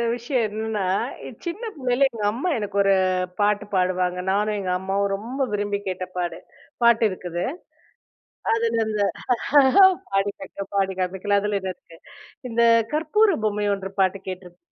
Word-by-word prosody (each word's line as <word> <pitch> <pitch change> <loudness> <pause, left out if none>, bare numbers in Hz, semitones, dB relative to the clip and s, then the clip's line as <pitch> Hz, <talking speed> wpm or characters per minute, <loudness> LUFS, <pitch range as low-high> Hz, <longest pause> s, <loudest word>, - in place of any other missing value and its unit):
விஷயம் 245 0 -1
என்னன்னா, 215 -2 -3 0.6
சின்ன 345 +7 -4
பிள்ளையில 255 0 +2
எங்க 230 -4 -8
அம்மா 255 +11 -2
எனக்கு 205 -2 -5
ஒரு 195 0 +4 0.4
பாட்டு 205 0 +2
பாடுவாங்க. 180 -1 +1
நானும், 210 +2 +1
எங்க 190 -2 -3
அம்மாவும் 195 +1 0
ரொம்ப 250 +7 -3
விரும்பி 205 0 -1
கேட்ட 185 -1 -3
பாடு 175 -2 -2 0.5
பாட்டு 235 -1 +5
இருக்குது. 180 -2 -4 1.1
அதுல 230 0 +1
அந்த 215 -1 -2 0.6
ஆஹ்ஹ, 275 +9 +6 0.3
பாடி 195 +1 +1
காற்றேன், 195 0 -8
பாடி 195 -1 +1
காமிக்கலாம் 190 +2 0
அதுல 210 -1 0
என்ன 190 -1 -3
இருக்கு 165 -2 -18 0.5
"இந்த 230 +1 0 0.3
கற்பூர 355 +6 +3
பொம்மை 210 -1 0
ஒன்று" 195 -1 -6
பாட்டு 190 +1 +2
கேட்டுருக் 180 -1 -8
205 Hz, 145 wpm, -23 LUFS, 190-230 Hz, 1.1 s, ஆஹ்ஹ